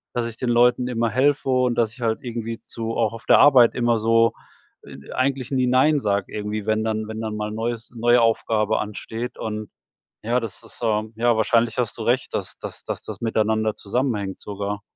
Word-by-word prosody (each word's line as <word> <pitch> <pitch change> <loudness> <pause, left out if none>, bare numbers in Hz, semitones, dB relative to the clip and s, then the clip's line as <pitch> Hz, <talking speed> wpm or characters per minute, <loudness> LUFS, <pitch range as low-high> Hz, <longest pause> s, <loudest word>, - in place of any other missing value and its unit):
dass 120 -1 0
ich 115 -1 -8
den 125 - -2
Leuten 125 +1 +3
immer 115 -2 0
helfe 135 +4 +1
und, 125 -1 +2
dass 115 -2 +1
ich 125 - -14
halt 115 -1 0
irgendwie 115 -3 -5
zu 115 0 -5
auch 115 -1 +1
auf 115 - -9
der - - +6
Arbeit 130 -5 +7
immer 120 -1 +1
so, 115 +1 +3 0.5
e - - -12
eigentlich 130 -1 -1
nie 130 -2 +1
„Nein“ 130 +5 +4
sag, 100 -5 0
irgendwie, 105 0 -4
wenn 110 0 +1
dann 110 -1 -2
wenn 110 0 -6
dann 110 -1 -3
mal 105 0 -3
'n - - -6
neues 115 0 -3
neue 120 +1 +4
Aufgabe 110 -1 +1
ansteht 110 +3 -5
und 110 -1 -5 0.5
ja, 120 +2 +2
das 115 -3 -7
ist 115 - -14
so 110 -2 -1
ja 120 +1 +2
wahrscheinlich 115 +2 +2
hast 120 -4 -2
du 115 - -5
recht 120 +3 0
dass - - -3
dass - - -7
dass - - -4
das - - -7
miteinander 110 -1 +1
zusammenhängt 105 -2 -2
sogar. 100 0 -4
115 Hz, 205 wpm, -23 LUFS, 110-120 Hz, 0.5 s, Arbeit